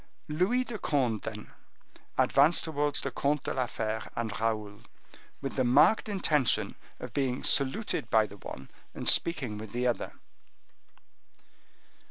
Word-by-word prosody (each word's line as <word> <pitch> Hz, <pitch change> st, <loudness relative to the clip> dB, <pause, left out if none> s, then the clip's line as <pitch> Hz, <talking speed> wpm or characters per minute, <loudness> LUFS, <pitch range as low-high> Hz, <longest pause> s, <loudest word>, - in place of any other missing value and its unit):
Louis 185 Hz, +12 st, +1 dB
de 230 Hz, -3 st, -6 dB
Conde 125 Hz, -, 0 dB
then 105 Hz, -1 st, -8 dB, 0.7 s
advanced 145 Hz, +5 st, +4 dB
towards 145 Hz, -2 st, -1 dB
the -, -, -4 dB
Comte 145 Hz, 0 st, -1 dB
de -, -, -3 dB
la 130 Hz, -2 st, -1 dB
Fere 110 Hz, -1 st, -3 dB
and 115 Hz, -2 st, -2 dB
Raoul, 105 Hz, -2 st, -2 dB, 0.6 s
with 135 Hz, -, -4 dB
the 130 Hz, -, +2 dB
marked 130 Hz, -, +4 dB
intention 155 Hz, -, +1 dB, 0.3 s
of -, -, -8 dB
being 135 Hz, -2 st, -1 dB
saluted 140 Hz, +11 st, +2 dB
by 110 Hz, -1 st, +4 dB
the 100 Hz, -1 st, -12 dB
one, 65 Hz, -7 st, -10 dB, 0.2 s
and -, -, -6 dB
of -, -, +5 dB
speaking 130 Hz, -11 st, +1 dB
with 110 Hz, -1 st, -9 dB
the 125 Hz, +1 st, -1 dB
other. 120 Hz, -1 st, -1 dB
130 Hz, 145 wpm, -29 LUFS, 110-150 Hz, 0.7 s, of